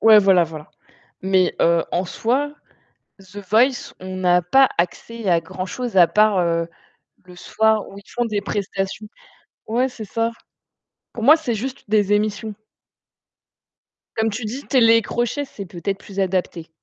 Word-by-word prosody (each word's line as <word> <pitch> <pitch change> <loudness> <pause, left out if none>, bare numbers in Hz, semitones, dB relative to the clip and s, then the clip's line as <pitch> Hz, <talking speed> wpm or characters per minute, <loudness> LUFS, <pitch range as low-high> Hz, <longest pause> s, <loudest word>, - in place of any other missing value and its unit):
ouais, 220 -1 +8
voilà, 190 -4 +4
voilà. 155 -1 -10 0.5
Mais 190 -1 +2
heu, 170 0 +3
en 180 - 0
soi, 270 +10 -1 0.6
The 195 +1 -12
Voice, 245 +5 +2
on 185 0 -7
n'a 180 -1 +3
pas 265 +10 +4
accès 205 +5 -3
à 170 -1 +3
grand-chose, 190 +7 -5
à 175 - +8
part, 210 +1 +3
heu, 170 -1 0 0.6
le 180 -1 -15
soir 220 +3 +1
où 195 - -11
ils 200 - -16
font 240 - -1
des 210 -2 -2
prestations, 200 +1 -4 0.6
ouais, 245 +4 +1
c'est 230 -3 -9
ça. 230 +3 -1 0.8
Pour 225 - -7
moi, 305 +4 +8
c'est 305 -8 -3
juste 260 +5 -5
des 210 -1 +2
émissions. 210 +1 -1 1.7
Comme 220 -1 +1
tu 220 +2 -5
dis, 250 +7 -5
télé-crochet, 240 +2 +2
c'est 200 -8 -9
peut-être 195 +3 -4
plus 195 -1 -8
adapté. 180 -3 -2
205 Hz, 150 wpm, -21 LUFS, 185-230 Hz, 1.7 s, ouais